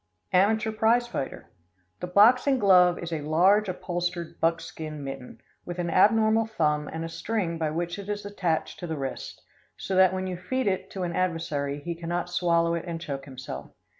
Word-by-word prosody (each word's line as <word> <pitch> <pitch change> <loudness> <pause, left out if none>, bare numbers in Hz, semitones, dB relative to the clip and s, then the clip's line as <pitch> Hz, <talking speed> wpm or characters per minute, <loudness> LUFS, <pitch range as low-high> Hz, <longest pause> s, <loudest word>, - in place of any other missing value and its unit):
Amateur 215 +4 +3
Prize 225 +3 +3
Fighter. 235 - -6 0.5
The 180 - -4
boxing 245 +8 +5
glove 180 -5 +5
is 170 -1 -5
a 155 - -2
large 185 +7 +3
upholstered 175 -2 -4
buckskin 160 -2 -2
mitten, 135 -2 -8 0.2
with 175 0 -6
an 175 -1 -2
abnormal 220 +2 +4
thumb 150 -8 0
and 165 +1 -5
a - - -4
string 170 -1 -2
by 160 -2 0
which 175 +4 -3
it 200 0 -8
is 205 0 -3
attached 180 -6 -2
to 175 - -5
the 160 -1 -3
wrist, 135 -2 -6 0.3
so 195 - -4
that 185 -1 +6
when 185 0 -3
you 185 -1 -4
feed 255 +9 -2
it 190 -1 -1
to 190 - -5
an 175 -1 -2
adversary 150 -5 -1
he 170 - -2
cannot 175 +1 -4
swallow 170 -1 +2
it 170 0 -3
and 165 -1 -4
choke 140 -4 -5
himself. 130 -2 -8
175 Hz, 185 wpm, -27 LUFS, 165-200 Hz, 0.5 s, that